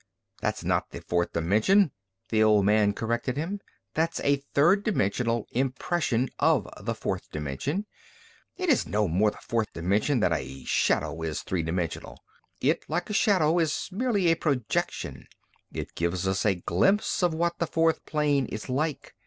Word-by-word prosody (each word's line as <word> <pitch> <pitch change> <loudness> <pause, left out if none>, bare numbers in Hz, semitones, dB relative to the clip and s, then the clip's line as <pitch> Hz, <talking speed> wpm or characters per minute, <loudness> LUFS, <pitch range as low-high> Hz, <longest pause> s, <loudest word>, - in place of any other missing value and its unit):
"That's - - -2
not - - 0
the - - -8
fourth 85 0 -1
dimension," 110 - +3 0.4
the 110 -1 +2
old 105 -2 +5
man 105 0 +4
corrected 120 +5 -2
him. 180 +7 -2 0.3
"That's 165 +1 0
a 140 0 +3 0.2
third 175 +8 +4
dimensional 115 - 0
impression 130 0 0
of - - +3
the - - -2
fourth - - -4
dimension. 75 - -3 0.7
It 370 - -2
is 285 -7 +3
no 105 0 +1
more 95 +6 +3
the - - -10
fourth 115 -2 0
dimension 100 - +1
than 90 -5 +2
a 65 0 -5
shadow 80 - +1
is 80 -2 -3
three 90 -2 -1
dimensional. 85 +1 -3 0.4
It, - - +1
like - - -2
a - - -2
shadow, 175 -6 +3
is 160 -3 -1
merely 205 -4 +1
a - - +4
projection. 135 -9 -2 0.4
It - - -6
gives 85 +2 -1
us 95 +3 +1
a 100 - +3
glimpse 195 - +1
of 175 -3 +2
what 170 +1 -1
the 170 - 0
fourth 165 0 +1
plane 145 -4 +1
is 110 +4 -6
like. 145 +3 -2
125 Hz, 160 wpm, -27 LUFS, -, 0.7 s, old